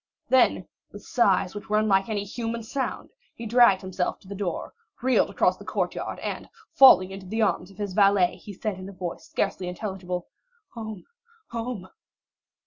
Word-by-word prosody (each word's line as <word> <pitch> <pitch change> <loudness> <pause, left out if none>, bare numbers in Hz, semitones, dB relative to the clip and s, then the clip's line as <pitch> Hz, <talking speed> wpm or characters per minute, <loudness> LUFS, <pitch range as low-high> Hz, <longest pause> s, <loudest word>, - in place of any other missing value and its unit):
Then, 260 -1 +3 0.2
with - - -11
sighs 195 -6 +2
which 205 0 -8
were 210 - +3
unlike 205 -1 +2
any 205 -2 -1
human 230 +2 -4
sound, 265 +4 -4 0.2
he 230 - -7
dragged 230 -4 +5
himself 185 -1 -2
to - - -18
the 200 - -6
door, 195 -3 -4 0.3
reeled 260 0 +3
across - - +2
the - - -12
courtyard, - - -3
and - - -5 0.2
falling 225 - +8
into 190 -1 -9
the 220 +3 0
arms 195 -3 0
of 195 - -17
his 205 -2 -4
valet, 195 -3 +4
he 210 - -10
said 200 0 -4
in 185 +1 -7
a - - -10
voice 180 -2 -6
scarcely 190 -2 -1
intelligible,—"Home, 210 - -7 0.5
home." 230 -5 -4
205 Hz, 165 wpm, -26 LUFS, 185-230 Hz, 0.5 s, falling